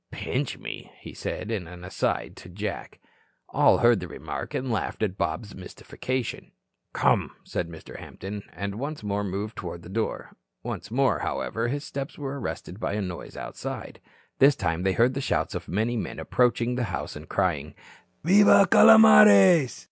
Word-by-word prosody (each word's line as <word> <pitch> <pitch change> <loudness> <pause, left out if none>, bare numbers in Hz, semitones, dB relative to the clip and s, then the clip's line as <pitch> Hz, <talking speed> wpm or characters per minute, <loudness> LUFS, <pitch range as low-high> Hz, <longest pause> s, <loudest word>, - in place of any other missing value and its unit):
"Pinch - - -3
me," - - -8
he - - -11
said, 110 - -5
in 100 -7 -3
an 90 +1 -11
aside 90 +2 -2
to - - -12
Jack. - - -6 0.5
All - - +4
heard 120 -3 +4
the 90 - -6
remark, - - -6
and 130 -1 -2
laughed 110 0 -2
at 100 -3 -1
Bob's 85 +4 -3
mystification. 125 +6 -5 0.4
"Come," - - +1
said 85 - -4
Mr. 80 -1 -10
Hampton, 100 +2 -7
and 100 +1 -5
once 145 -1 -5
more 100 0 -1
moved 100 +3 -4
toward 85 -2 -6
the 85 - -11
door. 110 +3 -3 0.3
Once - - -5
more, 130 +2 +2
however, 115 +1 -2
his 140 +4 -3
steps 140 +2 -6
were 140 -1 -5
arrested 95 -5 -6
by 100 - -2
a 105 - -1
noise 90 -2 -7
outside. - - -7 0.4
This 140 +1 +6
time 85 -2 -1
they 95 0 +1
heard 120 +6 +3
the 135 - -3
shouts - - -1
of - - -6
many 110 +6 -1
men 110 - -4
approaching 125 -1 +1
the 125 -1 -1
house - - -5
and 75 +1 -10
crying 80 -6 -1 0.5
"Viva, 200 +3 +6
Calomares." 105 - +7
105 Hz, 170 wpm, -26 LUFS, 90-125 Hz, 0.5 s, Calomares